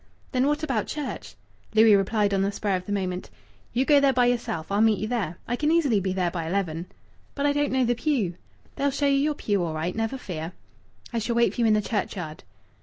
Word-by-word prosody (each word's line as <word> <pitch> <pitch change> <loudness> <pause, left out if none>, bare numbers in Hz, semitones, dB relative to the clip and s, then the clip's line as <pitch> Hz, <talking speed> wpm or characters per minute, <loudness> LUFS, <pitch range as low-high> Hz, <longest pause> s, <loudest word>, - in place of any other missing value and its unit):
"Then 255 0 +2
what 295 +1 0
about 255 -9 -1
church?" 295 -3 -5 0.4
Louis 220 -1 +7
replied 200 +1 +1
on 195 - +2
the 200 +1 +1
spur 200 -1 -1
of 180 0 -5
the - - -4
moment 185 -2 -2 0.4
"You 255 +4 +1
go 290 -1 +6
there 280 -1 +4
by 250 -1 +3
yourself. 230 -8 -1
I'll 200 +1 +2
meet 220 -2 +4
you 215 - -3
there. 205 -8 -2
I 245 - 0
can 300 +4 +1
easily 290 -11 +3
be 190 0 -1
there 180 -2 0
by 165 -2 -3
eleven." 170 -2 -2 0.5
"But 280 - -1
I 290 - +3
don't 290 0 0
know 260 -1 +2
the 240 - +2
pew." 240 - 0 0.4
"They'll 280 +1 +2
show 280 +1 -1
you 275 -1 +3
your 295 +1 +1
pew 205 -8 0
all 160 -2 -3
right, 165 +3 -2
never 225 +4 -1
fear." 170 -7 -6 0.6
"I 230 - +1
shall 230 +2 -2
wait 235 0 +3
for 245 - -2
you 230 - +4
in 215 - +5
the 210 - +1
churchyard." 180 -8 -3
220 Hz, 240 wpm, -26 LUFS, 190-265 Hz, 0.6 s, Louis